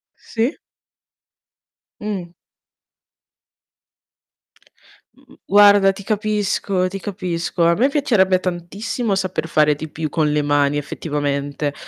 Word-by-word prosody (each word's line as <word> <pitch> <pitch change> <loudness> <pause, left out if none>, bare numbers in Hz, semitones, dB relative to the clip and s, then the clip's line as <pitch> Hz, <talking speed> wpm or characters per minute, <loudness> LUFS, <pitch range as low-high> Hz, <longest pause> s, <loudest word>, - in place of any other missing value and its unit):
Sì. 230 +6 -2 1.4
Mh. 190 -5 -4 2.8
Mh-mh, 275 0 -21
guarda 205 -1 +6
ti 195 0 -10
capisco, 205 -3 0
ti 195 +2 -6
capisco. 175 -3 -2
A 170 - +5
me 250 +9 +2
piacerebbe 215 -11 +2
tantissimo 195 +5 -3
saper 185 -4 -2
fare 150 -2 +3
di 155 +2 -7
più 155 0 -4
con 155 -2 0
le 150 - +1
mani 145 0 +2
effettivamente, 145 -1 -3
185 Hz, 100 wpm, -20 LUFS, 155-205 Hz, 2.8 s, guarda